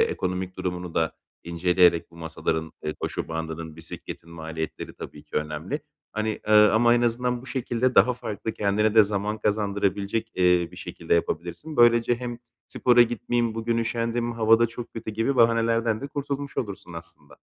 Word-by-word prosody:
ekonomik 95 Hz, -, -1 dB
durumunu 90 Hz, -2 st, -4 dB
da 80 Hz, -1 st, +1 dB, 0.3 s
inceleyerek 85 Hz, 0 st, +3 dB
bu 85 Hz, -, -17 dB
masaların, 80 Hz, -1 st, -3 dB
eee, 75 Hz, 0 st, -2 dB
koşu -, -, -3 dB
bandının, 80 Hz, -1 st, -5 dB
bisikletin 80 Hz, +1 st, -9 dB
maliyetleri 80 Hz, -1 st, -6 dB
tabii 75 Hz, -, -9 dB
ki 75 Hz, -, -6 dB
önemli. 75 Hz, -, -3 dB, 0.3 s
Hani, 110 Hz, 0 st, -1 dB, 0.2 s
eee, -, -, +3 dB
ama 110 Hz, +3 st, +6 dB
en 120 Hz, -, +2 dB
azından 120 Hz, +1 st, 0 dB
bu -, -, -13 dB
şekilde 125 Hz, -1 st, -1 dB
daha 125 Hz, -, +6 dB
farklı, 110 Hz, -1 st, -5 dB
kendine 105 Hz, +1 st, +1 dB
de 110 Hz, -1 st, +8 dB
zaman 105 Hz, +1 st, -2 dB
kazandırabilecek, 105 Hz, +1 st, -1 dB
eee, 90 Hz, -2 st, +3 dB
bir -, -, -14 dB
şekilde 85 Hz, -, -2 dB
yapabilirsin. 85 Hz, -, -2 dB
Böylece 120 Hz, 0 st, +5 dB
hem, 120 Hz, -1 st, -5 dB, 0.3 s
"Spora 120 Hz, -1 st, +5 dB
gitmeyeyim, 120 Hz, -1 st, -1 dB
bugün 115 Hz, +1 st, -1 dB
üşendim, 115 Hz, +1 st, -1 dB
hava 115 Hz, -1 st, +4 dB
da 115 Hz, -, +4 dB
çok 115 Hz, +1 st, -8 dB
kötü." 115 Hz, -1 st, -5 dB
gibi 115 Hz, +5 st, 0 dB
bahanelerden 115 Hz, -1 st, +3 dB
de 140 Hz, -, -4 dB
kurtulmuş 140 Hz, 0 st, -4 dB
olursun 100 Hz, -6 st, -4 dB
aslında. 85 Hz, -3 st, -8 dB
110 Hz, 160 wpm, -25 LUFS, 85-120 Hz, 0.3 s, de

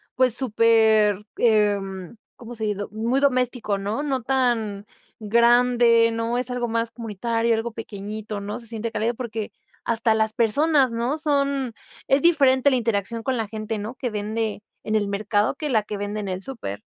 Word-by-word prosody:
pues, 255 Hz, -2 st, +3 dB
súper, 220 Hz, -4 st, +3 dB
em, 205 Hz, -4 st, +1 dB, 0.2 s
¿cómo 240 Hz, 0 st, -9 dB
se 220 Hz, -, -6 dB
ha -, -, 0 dB
ido? 205 Hz, -1 st, -3 dB
Muy 235 Hz, +5 st, 0 dB
doméstico, 250 Hz, -6 st, +1 dB
¿no? 205 Hz, +7 st, -3 dB
No 270 Hz, -4 st, -1 dB
tan 230 Hz, -6 st, 0 dB, 0.3 s
grande, 235 Hz, +1 st, +4 dB
¿no? 230 Hz, +1 st, -1 dB
Es 250 Hz, 0 st, -3 dB
algo 245 Hz, -1 st, -2 dB
más 230 Hz, 0 st, -1 dB
comunitario, 230 Hz, +1 st, -1 dB
algo 225 Hz, 0 st, -3 dB
pequeñito, 215 Hz, 0 st, -6 dB
¿no? 205 Hz, +4 st, -5 dB
Se 230 Hz, -, -12 dB
siente 230 Hz, 0 st, -4 dB
cálido, 225 Hz, +2 st, -1 dB
porque 225 Hz, -3 st, -5 dB, 0.3 s
hasta 225 Hz, -1 st, +1 dB
las 220 Hz, 0 st, +1 dB
personas, 260 Hz, +3 st, +2 dB
¿no? 240 Hz, +6 st, -1 dB
Son 280 Hz, -5 st, 0 dB, 0.3 s
es 270 Hz, +1 st, +3 dB
diferente 280 Hz, -5 st, +4 dB
la 260 Hz, -, +2 dB
interacción 225 Hz, 0 st, -1 dB
con 260 Hz, +2 st, -1 dB
la 220 Hz, -3 st, -3 dB
gente, 215 Hz, 0 st, -4 dB
¿no?, 220 Hz, +5 st, -6 dB
que 250 Hz, -, -3 dB
vende 215 Hz, 0 st, -3 dB, 0.2 s
en 220 Hz, -, -1 dB
el 205 Hz, -2 st, +1 dB
mercado 205 Hz, +3 st, 0 dB
que 300 Hz, 0 st, -4 dB
la 220 Hz, -5 st, +2 dB
que 210 Hz, -, -6 dB
vende 205 Hz, +1 st, -4 dB
en 200 Hz, -, -5 dB
el 185 Hz, +1 st, -4 dB
súper. 150 Hz, -, -6 dB
230 Hz, 175 wpm, -23 LUFS, 210-245 Hz, 0.3 s, grande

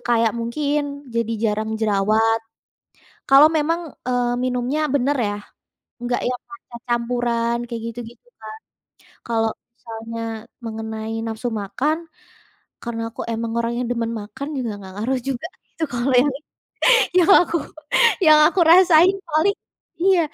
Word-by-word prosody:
kayak 230 Hz, -2 st, +3 dB
mungkin 285 Hz, +3 st, -2 dB
jadi 230 Hz, -1 st, 0 dB
jarang 220 Hz, 0 st, 0 dB
jerawat. 215 Hz, +2 st, +2 dB, 0.9 s
Kalau 275 Hz, +3 st, +8 dB
memang, 325 Hz, +1 st, -1 dB, 0.2 s
eee, 245 Hz, -1 st, +1 dB
minumnya 255 Hz, +5 st, -1 dB
bener 280 Hz, +2 st, +1 dB
ya, 205 Hz, -3 st, -1 dB, 0.7 s
nggak 245 Hz, 0 st, 0 dB
yang 250 Hz, 0 st, -3 dB
matcha 235 Hz, 0 st, -12 dB
campuran 235 Hz, -1 st, 0 dB
kayak 230 Hz, -2 st, -5 dB
gitu-gitu 240 Hz, -, -10 dB, 0.2 s
kan. 215 Hz, -, -7 dB, 0.8 s
Kalau 225 Hz, -1 st, +1 dB, 0.2 s
misalnya 230 Hz, -1 st, -8 dB, 0.4 s
mengenai 220 Hz, 0 st, -5 dB
nafsu 225 Hz, +2 st, -3 dB
makan, 220 Hz, +9 st, -1 dB, 0.9 s
karena 235 Hz, -1 st, -4 dB
aku -, -, -7 dB
emang 230 Hz, 0 st, -3 dB
orangnya 235 Hz, +1 st, -1 dB
demen 230 Hz, -1 st, -1 dB
makan 215 Hz, +6 st, -7 dB
juga 245 Hz, -4 st, -2 dB
nggak 190 Hz, -1 st, -11 dB
ngaruh 260 Hz, +2 st, 0 dB
juga 270 Hz, +4 st, -3 dB, 0.3 s
itu -, -, -3 dB
kalau 245 Hz, +2 st, 0 dB
yang 270 Hz, +3 st, +4 dB
itu, 305 Hz, -, -39 dB, 0.7 s
yang 345 Hz, -, +3 dB
aku 340 Hz, -, -2 dB, 0.7 s
yang 310 Hz, -1 st, +7 dB
aku 370 Hz, -, -1 dB
rasain 350 Hz, +1 st, +6 dB, 0.2 s
paling 320 Hz, +5 st, +2 dB, 0.5 s
iya, 375 Hz, -1 st, +4 dB
240 Hz, 130 wpm, -21 LUFS, 225-285 Hz, 0.9 s, Kalau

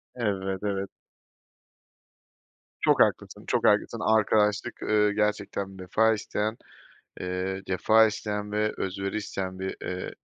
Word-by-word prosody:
Evet, 95 Hz, -5 st, -1 dB
evet. 100 Hz, -1 st, -2 dB, 1.9 s
Çok -, -, +4 dB
haklısın -, -, +1 dB
çok -, -, +1 dB
haklısın -, -, +2 dB, 0.2 s
arkadaşlık, 105 Hz, -1 st, +1 dB
ııı, 105 Hz, -1 st, +3 dB
gerçekten 100 Hz, -2 st, -2 dB
vefa 110 Hz, +5 st, +2 dB
isteyen, 105 Hz, +1 st, -2 dB, 0.6 s
ııı, 95 Hz, +1 st, -3 dB
cefa 110 Hz, +4 st, +4 dB
isteyen 105 Hz, -1 st, -3 dB
ve 105 Hz, 0 st, +1 dB
özveri 95 Hz, +2 st, -3 dB
isteyen 95 Hz, -3 st, -4 dB
bir 95 Hz, 0 st, -4 dB
ııı 90 Hz, 0 st, -4 dB
100 Hz, 110 wpm, -27 LUFS, 95-105 Hz, 1.9 s, Çok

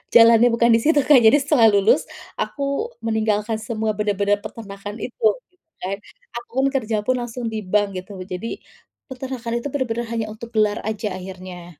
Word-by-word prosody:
jalannya 230 Hz, +1 st, +8 dB
bukan 235 Hz, 0 st, +3 dB
di -, -, +3 dB
situ, 300 Hz, -1 st, +4 dB
Kak. 295 Hz, -, +7 dB
Jadi 280 Hz, +6 st, +7 dB
setelah 275 Hz, -6 st, +5 dB
lulus 200 Hz, +1 st, +4 dB, 0.4 s
aku 280 Hz, +11 st, -2 dB
meninggalkan 220 Hz, -1 st, 0 dB
semua 220 Hz, -3 st, -1 dB
bener-bener 205 Hz, -1 st, +1 dB
peternakan 205 Hz, -1 st, -8 dB
itu, -, -, -8 dB, 0.2 s
gitu 360 Hz, -1 st, -41 dB
kan. 190 Hz, +2 st, -3 dB, 0.5 s
Aku -, -, -35 dB
pun 270 Hz, -, +3 dB
kerja 225 Hz, -4 st, 0 dB
pun 255 Hz, -, +3 dB
langsung 240 Hz, 0 st, -5 dB
di 220 Hz, -, -3 dB
bank 205 Hz, -2 st, +2 dB
gitu. 195 Hz, 0 st, -11 dB
Jadi 185 Hz, +5 st, -4 dB, 0.6 s
peternakan 255 Hz, -3 st, -5 dB
itu -, -, -2 dB
bener-bener 240 Hz, -4 st, -2 dB
hanya 230 Hz, -1 st, -1 dB
untuk 230 Hz, +1 st, -10 dB
gelar 215 Hz, -2 st, +2 dB
aja 215 Hz, 0 st, -3 dB
akhirnya. 180 Hz, -2 st, -9 dB
225 Hz, 170 wpm, -22 LUFS, 205-245 Hz, 0.6 s, jalannya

